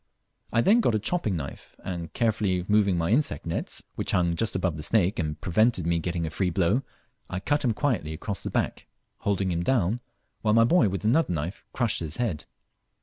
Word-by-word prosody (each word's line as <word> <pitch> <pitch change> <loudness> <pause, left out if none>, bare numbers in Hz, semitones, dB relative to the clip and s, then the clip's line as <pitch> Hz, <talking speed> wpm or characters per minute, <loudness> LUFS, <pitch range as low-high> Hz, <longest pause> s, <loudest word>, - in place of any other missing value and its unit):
I 115 - +3
them 220 - +5
got 120 - +2
a - - +2
chopping 110 - -1
knife, 70 -4 -7
and 85 -3 -5
carefully 105 -6 0
moving 105 -3 +3
my 85 +2 0
insect 120 - +1
nets, - - -3
which - - -2
hung 85 -1 +2
just 110 +1 -1
over 90 -3 0
the 80 - -6
snake 95 +3 +2
and 75 -2 -2
prevented 100 0 +2
me 85 0 +1
getting 85 0 -2
a 80 - -4
free 95 +1 0
blow, 95 +8 +2 0.5
I 95 - -3
cut 145 +9 0
him 120 -4 +2
quietly 105 - -1
across 100 +5 -4
the - - -4
back, - - -2 0.3
holding 100 -2 0
him 85 0 -1
down 110 0 +1 0.4
while 105 0 +2
my 115 - +6
boy 120 - +4
with 95 +2 -4
another 130 - +3
knife 85 +5 -4
crushed 120 -4 0
his 80 -2 -4
head. 105 -11 -2
95 Hz, 205 wpm, -26 LUFS, 85-115 Hz, 0.5 s, my